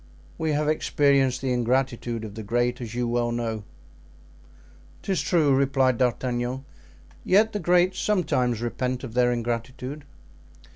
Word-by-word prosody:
We 160 -1 0
have 150 +1 0
experienced 140 -4 +2
the 130 -1 0
ingratitude 120 -2 -1
of 105 - -8
'the 110 - -7
great,' 120 +3 0
as 115 -1 -6
you 120 0 0
well 120 0 0
know." 115 -2 -3 1.4
"'Tis 190 -3 0
true," 155 -6 +3
replied 135 -2 +2
D'Artagnan. 125 +1 -1 0.6
"Yet 215 +4 +3
the 205 - -1
great 180 +1 +3
sometimes 130 - 0
repent 125 +2 -2
of 120 -4 -7
their 125 0 +3
ingratitude." 125 +4 -4
125 Hz, 135 wpm, -25 LUFS, 120-145 Hz, 1.4 s, true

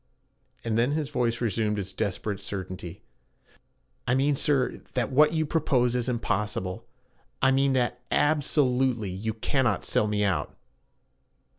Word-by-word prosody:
And 115 -1 0
then 125 +5 +2
his 150 -2 -2
voice 120 -4 0
resumed 110 -2 0
its 95 -1 -5
desperate 100 0 -2
certainty. 95 -3 -6 1.0
'I 125 - +3
mean, 140 +2 +2
sir, 135 -2 0
that 125 -2 0
what 150 +4 +5
you 160 -1 +1
propose 135 -6 +1
is 125 0 0
impossible. 105 -2 -2 0.5
I 135 - +4
mean 135 0 +3
that 125 -1 0
ab 150 0 +2
so 145 +1 +2
lute 125 0 +1
ly 110 - -5
you 105 +4 -3
cannot 120 -1 0
sell 105 - +2
me 105 0 0
out.' 100 -3 -1
120 Hz, 150 wpm, -27 LUFS, 105-135 Hz, 1.0 s, what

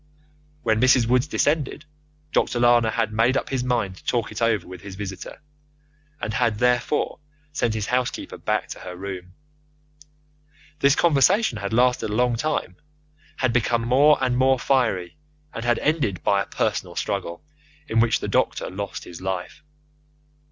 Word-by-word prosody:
When 110 -1 +2
Mrs. 130 -2 +5
Woods 125 +3 +2
descended, 150 0 0 0.5
Dr. 120 - +1
Lana 120 -1 +4
had 110 -1 -1
made 115 +4 +3
up - - -3
his 130 -2 -1
mind 115 -7 -1
to - - -16
talk 120 -3 -1
it - - -6
over 115 -5 +1
with 90 -1 -10
his 100 -1 -9
visitor, 95 +7 -7 0.8
and 110 - -3
had, 115 -3 +1
therefore, 125 +5 +1 0.3
sent 120 -7 -1
his 110 -1 -2
housekeeper 125 +1 -2
back - - -1
to - - -7
her 90 -1 -8
room. 90 -1 -7 1.4
This 140 +1 +4
conversation 170 - +3
had 100 -1 -4
lasted 125 -1 +2
a 105 - -2
long 125 0 +2
time, 120 -9 -2 0.6
had 130 -3 +1
become 120 -1 +1
more 140 +6 +5
and 125 -1 +1
more 130 +1 +3
fiery, 120 -8 0 0.4
and 115 - -5
had 120 -1 +2
ended 145 - 0
by 100 -1 +3
a - - -4
personal - - -2
struggle, 95 -4 -3 0.4
in 115 -3 +1
which 115 0 +2
the - - -3
doctor - - 0
lost 100 +1 -5
his 85 0 -10
life. 95 +9 -4
120 Hz, 160 wpm, -23 LUFS, 100-130 Hz, 1.4 s, Mrs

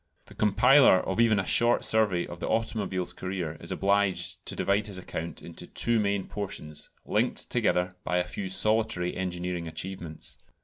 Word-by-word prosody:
The - - -14
compiler 125 +1 +5
of 95 +4 -3
even 115 -3 +4
a 95 - 0
short 120 0 +3
survey 105 -6 +2
of 85 - -9
the - - -3
automobile's 105 -5 -1
career 90 -4 -4
is - - -2
obliged 100 -1 +1
to - - -2
divide 100 +2 +1
his 100 -3 -4
account 85 -2 -6
into 85 - -9
two 120 -1 +1
main 100 -2 0
portions, 80 -7 -6 0.2
linked - - 0
together 90 0 +1
by 90 - 0
a 90 - +2
few 95 +2 -5
solitary 105 -3 +1
engineering 90 -2 -3
achievements. 85 0 -6
95 Hz, 165 wpm, -28 LUFS, 90-105 Hz, 0.2 s, compiler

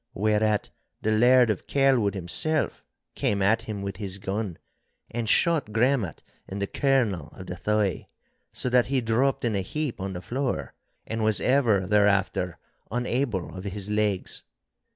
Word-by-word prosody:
Whereat 105 +1 +1 0.3
the 110 - +2
Laird 120 +1 +5
of 100 - -5
Kelwood 130 -7 +3
himself 140 - -1 0.3
came 100 - 0
at 110 +3 +3
him 105 -3 -5
with 100 -2 -4
his 95 -1 -5
gun, 100 -2 -3 0.5
and 115 -2 -2
shot 160 -8 +2
Gremmat 115 - +1 0.2
in 95 - -6
the 100 - -1
kernel 110 - +1
of 95 - -10
the 90 - -5
thigh, 105 0 0 0.4
so - - -1
that 125 -1 +4
he 135 0 +1
dropped 125 +3 +1
in 115 - +1
a 100 - +1
heap 140 +1 -3
on 95 0 -3
the 90 - -5
floor, 130 +4 -2 0.3
and 115 0 -3
was 110 -1 +3
ever 120 -8 +3
thereafter 100 -3 +2 0.3
unable 120 -5 -1
of 95 - -7
his 100 +1 -3
legs. 105 -3 -1
105 Hz, 155 wpm, -26 LUFS, 100-125 Hz, 0.5 s, Laird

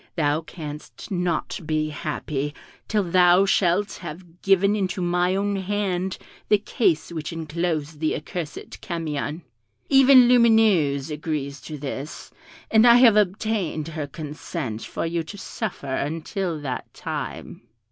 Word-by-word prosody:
Thou 150 -2 +1
canst 150 0 -9
not 175 -3 -1
be 155 0 -1
happy 150 -1 -3 0.3
till 210 -2 +1
thou 180 +1 +5
shalt 195 +1 +1
have 170 +1 -10
given 195 +1 +3
into 190 -2 -1
my 180 +1 +1
own 200 0 0
hand 190 -1 -1 0.3
the 210 - +6
case 200 -6 0
which 160 -3 -4
enclosed 160 -1 -3
the 155 0 0
accursed 155 0 -6
Camion. 160 -2 -3 0.5
Even 270 -2 +7
Lumineuse 215 - +4
agrees 150 -2 -4
to 155 - -7
this, 140 +1 -6 0.4
and 220 +2 +6
I 235 - +9
have 240 -3 +7
obtained 195 -5 0
her 155 -3 -4
consent 150 -5 -5
for - - -4
you 165 0 -1
to 165 +6 -9
suffer 185 - -5
until 165 +4 -2
that 130 -3 -5
time." - - -6
170 Hz, 130 wpm, -24 LUFS, 150-195 Hz, 0.5 s, I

